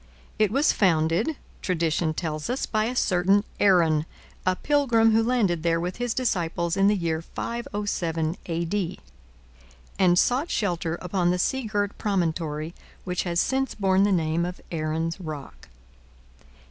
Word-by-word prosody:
It 215 Hz, -2 st, +4 dB
was 275 Hz, +8 st, +3 dB
founded, 175 Hz, -, +2 dB, 0.3 s
tradition 165 Hz, -2 st, 0 dB
tells 155 Hz, +2 st, -3 dB
us, 255 Hz, +2 st, -1 dB
by 215 Hz, -1 st, 0 dB
a 245 Hz, +3 st, -2 dB
certain 195 Hz, -1 st, +3 dB, 0.2 s
Aaron, 165 Hz, -6 st, +4 dB, 0.4 s
a 185 Hz, -, +3 dB
pilgrim 240 Hz, -4 st, +3 dB
who 220 Hz, +1 st, +4 dB
landed 225 Hz, -8 st, +1 dB
there 165 Hz, 0 st, +1 dB
with 180 Hz, +2 st, -3 dB
his 245 Hz, -1 st, -2 dB
disciples 170 Hz, -7 st, 0 dB
in 195 Hz, 0 st, +4 dB
the 210 Hz, -, +4 dB
year 165 Hz, -4 st, -1 dB
507 175 Hz, -7 st, -3 dB
A.D., 170 Hz, +2 st, -2 dB, 1.0 s
and 180 Hz, -2 st, +4 dB
sought 260 Hz, -, +2 dB
shelter 175 Hz, -5 st, -1 dB
upon 180 Hz, -1 st, +1 dB
the 180 Hz, -, +2 dB
sea 265 Hz, +7 st, 0 dB
girt 205 Hz, -2 st, -1 dB
promontory 165 Hz, -5 st, -1 dB, 0.3 s
which 180 Hz, 0 st, -2 dB
has 170 Hz, -1 st, 0 dB
since 270 Hz, +5 st, 0 dB
borne 190 Hz, -2 st, +2 dB
the 205 Hz, +1 st, +3 dB
name 165 Hz, -2 st, +1 dB
of 180 Hz, +1 st, -4 dB
Aaron's 165 Hz, +1 st, -2 dB
Rock. 155 Hz, -5 st, -8 dB
180 Hz, 145 wpm, -25 LUFS, 165-210 Hz, 1.0 s, It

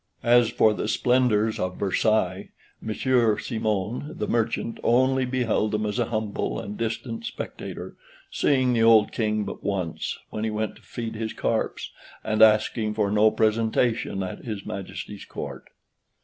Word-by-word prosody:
As 120 Hz, -1 st, +5 dB
for 110 Hz, -, +3 dB
the 105 Hz, -, -3 dB
splendors 115 Hz, -3 st, +2 dB
of 90 Hz, 0 st, -2 dB
Versailles, 100 Hz, -1 st, +1 dB, 0.3 s
Monsieur 115 Hz, 0 st, +2 dB
Simon, 110 Hz, +5 st, -2 dB
the -, -, -2 dB
merchant, 115 Hz, 0 st, -1 dB
only 130 Hz, +2 st, +3 dB
beheld 125 Hz, -4 st, 0 dB
them 105 Hz, 0 st, 0 dB
as 105 Hz, +4 st, -2 dB
a 120 Hz, -, +2 dB
humble 110 Hz, -2 st, -2 dB
and 100 Hz, +1 st, -6 dB
distant 115 Hz, -, -3 dB
spectator, 230 Hz, -, -6 dB, 0.4 s
seeing 130 Hz, -3 st, +2 dB
the 115 Hz, -, +2 dB
old 115 Hz, -2 st, +6 dB
King 110 Hz, -2 st, 0 dB
but -, -, -7 dB
once, 95 Hz, -5 st, -2 dB
when 110 Hz, -, -4 dB
he 110 Hz, -, 0 dB
went 110 Hz, 0 st, -2 dB
to -, -, -20 dB
feed 115 Hz, -2 st, -6 dB
his 110 Hz, 0 st, -4 dB
carps; -, -, -2 dB, 0.3 s
and 110 Hz, 0 st, 0 dB
asking 110 Hz, 0 st, +4 dB
for 105 Hz, -2 st, +1 dB
no 105 Hz, +1 st, +5 dB
presentation 110 Hz, -1 st, +1 dB
at 95 Hz, -, -6 dB
his 105 Hz, -4 st, -5 dB
Majesty's 100 Hz, +1 st, -6 dB
Court. -, -, -7 dB
110 Hz, 150 wpm, -25 LUFS, 105-120 Hz, 0.4 s, old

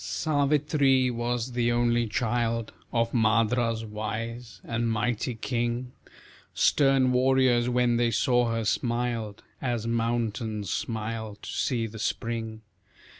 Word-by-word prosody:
Savitri 145 Hz, -3 st, +2 dB
was 120 Hz, +1 st, -2 dB
the 120 Hz, -1 st, +1 dB
only 120 Hz, 0 st, +2 dB
child 115 Hz, 0 st, -1 dB, 0.2 s
Of 115 Hz, -1 st, +1 dB
Madra's 115 Hz, 0 st, +2 dB
wise 115 Hz, +2 st, -5 dB
and 115 Hz, 0 st, -1 dB
mighty 115 Hz, +2 st, -1 dB
king; 120 Hz, +1 st, -2 dB, 0.6 s
Stern 135 Hz, -3 st, +3 dB
warriors, 125 Hz, -1 st, +3 dB
when 125 Hz, -1 st, +2 dB
they 120 Hz, 0 st, +2 dB
saw 120 Hz, +1 st, +2 dB
her, 115 Hz, -1 st, -1 dB
smiled, 115 Hz, -2 st, -1 dB, 0.2 s
As 120 Hz, -4 st, -1 dB
mountains 115 Hz, -3 st, -1 dB
smile 110 Hz, -1 st, -3 dB
to -, -, -7 dB
see 120 Hz, -4 st, 0 dB
the 110 Hz, 0 st, -8 dB
spring. 115 Hz, 0 st, -3 dB
120 Hz, 115 wpm, -27 LUFS, 115-125 Hz, 0.6 s, Stern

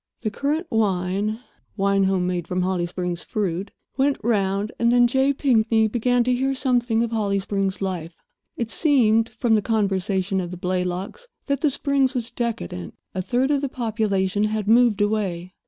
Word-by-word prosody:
The 215 Hz, -3 st, -2 dB
currant 295 Hz, -, -1 dB
wine—wine 200 Hz, 0 st, -1 dB
home 190 Hz, -2 st, +1 dB
made 175 Hz, -2 st, -2 dB
from 180 Hz, 0 st, -1 dB
the -, -, 0 dB
Holly 180 Hz, -2 st, 0 dB
Springs 180 Hz, -1 st, -4 dB
fruit—went 210 Hz, +7 st, -2 dB
round, 200 Hz, -2 st, 0 dB
and 235 Hz, 0 st, +3 dB
then 245 Hz, 0 st, +5 dB
J. 265 Hz, +3 st, +2 dB
Pinkney 225 Hz, -5 st, +2 dB
began 245 Hz, +2 st, +1 dB
to 250 Hz, +1 st, +1 dB
hear 270 Hz, +2 st, 0 dB
something 245 Hz, -3 st, +1 dB
of 235 Hz, -, -3 dB
Holly 205 Hz, -3 st, 0 dB
Springs 195 Hz, 0 st, -2 dB
life. 175 Hz, -3 st, -4 dB, 0.4 s
It 230 Hz, -1 st, -3 dB
seemed 230 Hz, -7 st, +3 dB
(from 240 Hz, -3 st, 0 dB
the 215 Hz, -, +4 dB
conversation 195 Hz, -3 st, 0 dB
of 175 Hz, -, -5 dB
the 180 Hz, -, -7 dB
Blaylocks) 180 Hz, -, -3 dB, 0.2 s
that 280 Hz, -1 st, -1 dB
the 305 Hz, -, +3 dB
Springs 275 Hz, -1 st, +1 dB
was 235 Hz, -2 st, -2 dB
decadent. 150 Hz, -, -4 dB, 0.2 s
A 185 Hz, -, -2 dB
third 255 Hz, +7 st, 0 dB
of 285 Hz, -2 st, +2 dB
the 280 Hz, -, -2 dB
population 210 Hz, -5 st, 0 dB
had 215 Hz, -1 st, -2 dB
moved 230 Hz, -2 st, +4 dB
away. 190 Hz, -4 st, -1 dB
215 Hz, 170 wpm, -23 LUFS, 190-245 Hz, 0.4 s, then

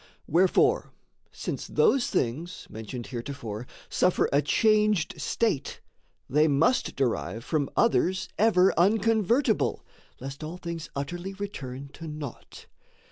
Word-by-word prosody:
Wherefore, 190 Hz, -, +3 dB, 0.4 s
since -, -, -5 dB
those 275 Hz, -, +3 dB
things, 155 Hz, +9 st, -2 dB
mentioned 110 Hz, +2 st, -6 dB
heretofore, 120 Hz, -3 st, -6 dB, 0.2 s
Suffer 180 Hz, -, +2 dB
a 140 Hz, -, +5 dB
changed 210 Hz, +3 st, +2 dB
state, 185 Hz, -12 st, -1 dB, 0.5 s
they 150 Hz, +4 st, +3 dB
must 160 Hz, -, +2 dB
derive 115 Hz, -3 st, -1 dB
From 150 Hz, -4 st, 0 dB
others 190 Hz, -5 st, +2 dB
ever 195 Hz, -3 st, +5 dB
unconvertible, 220 Hz, +4 st, +2 dB, 0.4 s
Lest 135 Hz, +3 st, -7 dB
an 160 Hz, +3 st, -6 dB
things 170 Hz, -4 st, -6 dB
utterly 175 Hz, +7 st, -4 dB
return 140 Hz, -10 st, -6 dB
to 165 Hz, -, -8 dB
naught. 150 Hz, -4 st, -8 dB
165 Hz, 110 wpm, -27 LUFS, 140-205 Hz, 0.5 s, a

